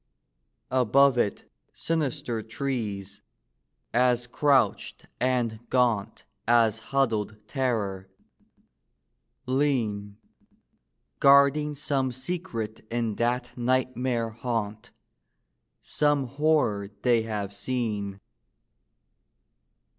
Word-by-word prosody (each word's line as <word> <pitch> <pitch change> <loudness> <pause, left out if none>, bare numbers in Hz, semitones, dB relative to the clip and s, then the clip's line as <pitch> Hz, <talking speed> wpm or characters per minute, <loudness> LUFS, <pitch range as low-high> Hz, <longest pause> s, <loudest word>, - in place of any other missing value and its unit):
Above 130 +2 +4
it 110 -4 -1 0.3
sinister 135 -8 -2
trees, 110 -5 -4 0.7
as 125 0 +3
crouched 130 -3 +1
and 120 -3 0
gaunt 120 -6 +1 0.2
As 115 -2 +4
huddled 110 -6 0
Terror, 105 -8 -2 1.4
lean; 120 -7 0 1.0
Guarding 140 +2 +5
some 135 -2 0
secret 130 - -4
in 115 -2 -1
that 120 +1 -1
nightmare 125 -1 0
haunt, 110 -2 -4 0.9
Some 145 -2 +1
horror 135 -7 +1
they 120 -2 +4
have 105 -3 -4
seen. 105 -4 -3
120 Hz, 70 wpm, -27 LUFS, 110-135 Hz, 1.4 s, Guarding